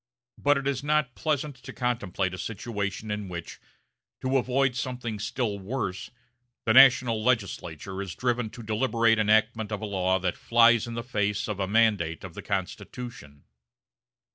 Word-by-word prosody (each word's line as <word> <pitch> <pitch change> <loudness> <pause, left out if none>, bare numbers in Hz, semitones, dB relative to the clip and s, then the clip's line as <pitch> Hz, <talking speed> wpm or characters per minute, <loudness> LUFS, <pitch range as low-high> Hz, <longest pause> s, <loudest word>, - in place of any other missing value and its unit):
But 145 0 +3
it 140 0 -3
is 140 -1 -1
not 150 -3 +1
pleasant 150 -2 -2
to 130 - -10
contemplate 105 -7 -1
a 90 - -6
situation 105 +1 -4
in 105 -2 -4
which, 85 -2 -7 0.6
to 130 +1 +1
avoid 130 0 +1
something 120 -3 -4
still 105 0 -2
worse, 95 -2 -4 0.6
the 110 - +3
national 125 -4 +6
legislature 95 -6 -1
is 95 -3 -6
driven 120 -2 -1
to 120 - -10
the - - -11
deliberate 115 -1 +2
enactment 110 0 +2
of 105 - -2
a 110 - -4
law 95 -2 +1
that 95 -1 -2
flies 115 -1 +4
in 115 - -5
the 115 - -3
face 105 -4 -1
of 105 -2 -4
a 95 - 0
mandate 105 -6 +2
of 95 -3 -8
the - - -7
Constitution. 100 - -5
110 Hz, 165 wpm, -27 LUFS, 100-125 Hz, 0.6 s, national